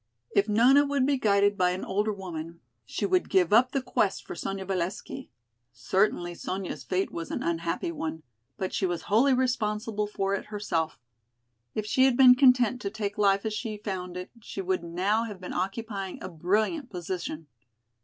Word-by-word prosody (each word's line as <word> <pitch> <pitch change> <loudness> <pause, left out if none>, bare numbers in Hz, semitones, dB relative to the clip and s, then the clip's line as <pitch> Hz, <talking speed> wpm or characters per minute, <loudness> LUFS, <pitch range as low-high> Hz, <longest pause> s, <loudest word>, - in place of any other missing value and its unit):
If 200 +2 +2
Nona 250 +7 +6
would 280 -2 +1
be 275 -1 +1
guided 205 -2 +3
by 180 -1 +4
an 180 +1 -3
older 210 +3 0
woman 170 -4 -7 0.3
she - - -2
would 370 -2 +1
give 185 -1 +3
up 250 +3 +5
the 270 -2 -1
quest 205 -5 0
for - - -6
Sonya 195 0 -4
Valesky. 190 +8 -4 0.4
Certainly 175 - 0
Sonya's 185 +2 -5
fate 185 +1 -1
was 165 -1 -5
an - - -3
unhappy 170 0 -1
one, 160 -1 -5 0.3
but 190 - -3
she 190 - +1
was 175 -1 -3
wholly 250 +6 +4
responsible 220 -4 -1
for 195 -1 -1
it 200 - -2
herself. 170 - -2 0.8
If 215 - -2
she 260 +5 +3
had 260 -2 +3
been 255 -2 +9
content 250 -2 +4
to 200 - -2
take 205 0 -4
life 200 0 +3
as 220 - -1
she 215 -1 -4
found 185 -3 -5
it 180 +1 -7
she 200 - -8
would 185 -2 -1
now 190 +7 0
have 210 -4 -7
been 180 - -7
occupying 195 0 -3
a 185 - -6
brilliant 215 - 0
position. 175 -3 -5
200 Hz, 180 wpm, -28 LUFS, 180-225 Hz, 0.8 s, been